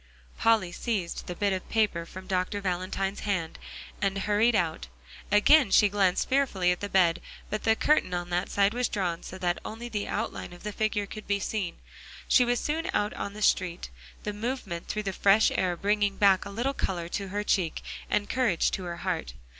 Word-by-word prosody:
Polly 220 -6 +2
seized 190 -2 -3
the 180 - -4
bit 200 +1 +1
of 185 - -5
paper 205 -7 +1
from 185 +2 -9
Dr. 185 +2 -1
Valentine's 190 +1 -2
hand, 185 -6 -2 0.4
and 195 -1 +1
hurried 210 +4 +2
out. 170 -5 0 0.4
Again 250 +5 +6
she 205 +2 +5
glanced 195 -2 +2
fearfully 245 -10 +2
at 180 - -1
the 205 - -4
bed, 175 -4 +3 0.3
but 215 - -3
the 225 0 +4
curtain 300 -6 +2
on 175 0 -3
that 180 +2 0
side 200 +1 +2
was 245 0 0
drawn 175 -4 -2
so 185 - -8
that 175 -2 -1
only 230 +2 -6
the 210 -3 -3
outline 215 -4 -4
of 175 - -13
the 210 - -3
figure 215 -1 0
could 215 +1 -9
be 200 0 +1
seen. 195 -3 -3 0.5
She 250 - +5
was 245 0 +1
soon 315 +2 -2
out 210 +1 +1
on 200 - -5
the 210 0 -5
street, 175 - +1 0.3
the 210 - -3
movement 210 -6 -4
through 215 - -2
the 195 -1 -2
fresh 200 +3 +4
air 180 -2 0
bringing 205 +1 +1
back 195 -2 +4
a - - -6
little 240 +7 -1
color 175 -9 -2
to 200 +2 -3
her 205 +2 -2
cheek 185 -6 0 0.3
and 205 - +1
courage 235 -9 +1
to 185 - -3
her 170 -1 -5
heart. - - -2
200 Hz, 200 wpm, -28 LUFS, 180-215 Hz, 0.5 s, Again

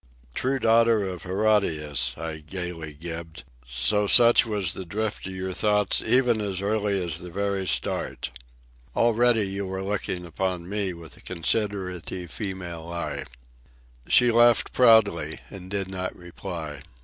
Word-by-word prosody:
"True 130 - 0
daughter 115 -2 +4
of 90 -2 -6
Herodias," 80 - +1
I 80 -1 -5
gaily 80 -1 -6
gibed, 80 0 -7 0.2
"so 85 - 0
such 120 +2 +7
was 100 -6 -1
the 95 - -5
drift 105 +3 -3
of - - -6
your 95 0 -4
thoughts 105 0 +2
even 120 -1 +3
as 100 -3 -2
early 100 0 0
as 85 -1 -1
the 90 0 -8
very 100 +1 -2
start. 65 - -1 0.6
Already 115 -2 +3
you 100 0 -4
were 95 0 -4
looking 95 -3 -2
upon 90 +1 -3
me 100 -1 -1
with 85 -2 -11
a - - -17
considerative 90 -2 -2
female 90 -5 -6
eye." 85 0 -4 0.8
She 125 -1 +5
laughed 120 +1 +4
proudly, 110 -10 +4
and 95 -1 -9
did 100 -1 -2
not 95 -1 -5
reply. 85 -4 -7
95 Hz, 140 wpm, -25 LUFS, 85-105 Hz, 0.8 s, such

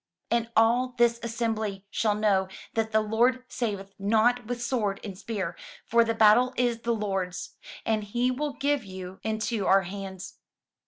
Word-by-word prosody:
And 235 -1 +1
all 245 +3 +3
this 235 0 +3
assembly 220 -4 -2
shall 215 -2 +1
know 200 -3 +2 0.3
that 220 -1 0
the 220 0 +3
Lord 240 +4 +2
saveth 200 -4 -3
not 225 +4 +2
with 245 0 -3
sword 225 -5 -1
and 200 -3 -6
spear: 190 -3 -4 0.3
for 235 0 +4
the 230 0 -1
battle 225 +4 +5
is 240 -2 +1
the 235 0 0
Lord's, 195 -4 -3 0.3
and 220 -1 +1
he 240 +5 0
will 290 +3 -2
give 285 -2 0
you 185 -1 -8
into 220 -1 -1
our 195 0 +5
hands." 190 0 -7
220 Hz, 160 wpm, -27 LUFS, 200-235 Hz, 0.3 s, battle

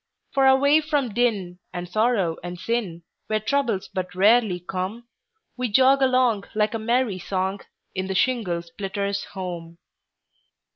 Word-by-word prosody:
For 270 -1 +4
away 280 +3 +5
from 295 -5 0
din, 200 -7 0
and 175 0 -5
sorrow 205 -4 +1
and 175 0 -6
sin, 185 -4 -2 0.2
Where 215 0 +1
troubles 225 -4 0
but 185 -1 -5
rarely 205 -1 +4
come, 190 +6 -5 0.5
We 250 0 -1
jog 265 +4 +5
along, 255 -6 +3
like 215 0 +1
a 225 - -2
merry 230 -3 0
song, 190 +2 -2 0.3
In 190 0 -3
the 190 - -3
shingle 185 -6 +1
splitter's 200 +3 -3
home. 175 -3 -6
205 Hz, 140 wpm, -24 LUFS, 185-245 Hz, 0.5 s, away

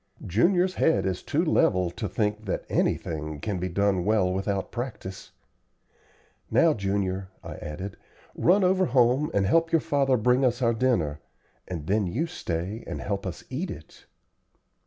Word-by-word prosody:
Junior's 175 - +2
head 100 - +2
is 95 -2 -1
too - - 0
level 90 -2 +2
to 105 +3 -4
think 105 0 -1
that 95 - -3
anything 75 -2 -1
can 100 +3 -3
be 90 +1 -2
done 95 0 +1
well 100 -3 +2
without 95 0 -2
practice. 120 -6 -6 1.2
Now, 165 -2 +4
Junior," 95 -2 -2
I - - -7
added, 95 +6 -6 0.4
"run 190 +4 +3
over 185 +1 +3
home 125 +3 +3
and 100 -1 +1
help 165 +10 +3
your 165 - +4
father 140 -3 +2
bring 125 +4 +3
us 125 -1 +2
our 120 -2 +2
dinner, 110 - +1 0.5
and 85 -5 -5
then 100 +2 +1
you 125 - -1
stay 100 - -4
and - - -4
help 100 -1 -3
us 90 - -6
eat 165 +8 -3
it." 80 - -11
105 Hz, 155 wpm, -26 LUFS, 95-130 Hz, 1.2 s, Now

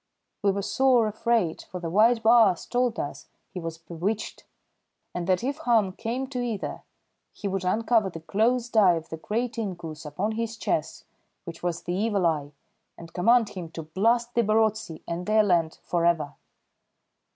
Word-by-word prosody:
We 205 - +3
were 200 0 0
sore 255 0 +3
afraid, 215 -5 0
for 180 - -8
the 165 -2 -4
white 225 +4 +4
baas 225 -6 +5
told 245 -2 0
us - - -5 0.2
he 185 - -5
was 165 -1 -5
bewitched, 175 +6 -4 0.7
and 175 -1 -3
that 185 +2 +2
if 275 +3 -1
harm 230 -9 +2
came 240 +6 -3
to 250 -3 -3
either 230 -5 -3 0.5
he 205 - -5
would 195 -1 -2
uncover 220 +2 +2
the 165 -3 -9
closed 235 +7 0
eye 195 -5 +6
of 165 -1 -6
the 160 - -5
great 230 +8 -2
inkoos 175 -7 -5
upon 170 +8 -2
his 225 0 -3
chest, 160 -7 -2 0.4
which 165 -1 -9
was 175 -1 -2
the 175 - -3
Evil 200 -1 +1
Eye, 150 -3 0 0.5
and 165 -1 -12
command 230 +4 +4
him 180 -5 -7
to 165 - -6
blast 230 +9 +1
the 235 - +3
Barotse 215 -5 0
and 170 +1 -4
their 215 0 +4
land 170 -5 +1
for 170 -1 -1
ever. 165 -4 +1
200 Hz, 175 wpm, -26 LUFS, 170-230 Hz, 0.7 s, eye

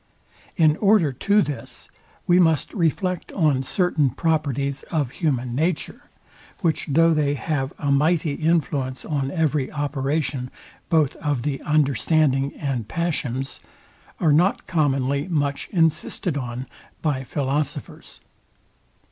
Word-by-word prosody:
In 155 -3 +4
order 200 -9 +3
to 205 - +3
this 145 - -5 0.4
we 175 +1 +4
must 160 -5 +2
reflect 180 0 -1
on 150 -8 +2
certain 155 -1 +1
properties 140 -2 -1
of 145 -7 -1
human 130 -7 -1
nature, 160 +5 -2 0.5
which 165 -3 0
though 165 +3 +4
they 145 -2 +1
have 140 -2 -2
a 145 - -1
mighty 155 +2 +2
influence 145 -5 0
on 140 -4 -1
every 150 -4 0
operation 145 -2 -2 0.4
both 155 -5 +2
of 145 -6 -1
the 140 -1 -2
understanding 145 -1 +2
and 130 -7 -3
passions, 135 -5 -2 0.6
are 155 -4 +3
not 175 +6 +2
commonly 140 -3 0
much 145 -5 -1
insisted 165 -1 0
on 125 -2 -4 0.4
by 145 -4 0
philosophers. 140 +1 -3
150 Hz, 115 wpm, -23 LUFS, 135-160 Hz, 0.6 s, In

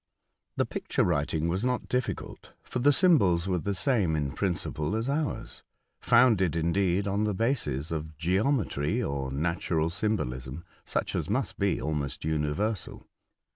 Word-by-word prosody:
The - - +1
picture - - -1
writing 75 +2 0
was 90 +5 -1
not 125 0 -1
difficult, 125 -1 -3
for 125 - -4
the 145 +4 +5
symbols 100 - +4
were 90 -2 +1
the 100 +4 -2
same 100 - +1
in 70 -3 -1
principle 90 0 -2
as 115 +2 -1
ours, 145 +1 -2 0.4
founded, 100 -10 +4
indeed, 90 +4 +1
on 100 +2 0
the 105 -2 0
bases 90 - 0
of 80 -1 -4
geometry, 95 - 0
or 70 -1 -3
natural 80 +2 0
symbolism, 80 - -2 0.2
such - - -2
as - - -2
must - - -1
be - - +1
almost 75 -2 -3
universal. 80 +7 -2
90 Hz, 140 wpm, -28 LUFS, 75-110 Hz, 0.4 s, the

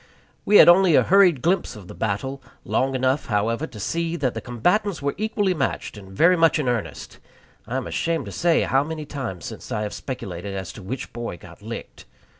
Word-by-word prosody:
We 210 - +6
had - - +9
only 175 -1 +6
a - - +6
hurried 180 -8 +4
glimpse 180 -5 +1
of 100 -4 -11
the - - -9
battle 130 +6 -3 0.2
long 135 0 0
enough, 130 +2 0
however, 115 +6 0
to 110 - -11
see 165 - -2
that 135 -7 -1
the 115 - -5
combatants 180 - 0
were 140 0 -1
equally 210 -2 0
matched 140 -8 -2
and 95 -2 -12
very 165 - +4
much 165 0 +4
in 150 -4 -1
earnest. 120 -4 -3 0.5
I 125 - -2
am 130 - -3
ashamed 165 -5 -1
to 100 - -7
say 170 - +2
how 135 +1 +2
many 155 0 -5
times 120 - -6
since - - -8
I 105 - -1
have 105 - -4
speculated 100 -7 -6
as 95 -3 -5
to 105 - -10
which 120 +8 -6
boy 115 -6 -5
got - - -15
licked. - - -8
135 Hz, 210 wpm, -23 LUFS, 110-170 Hz, 0.5 s, had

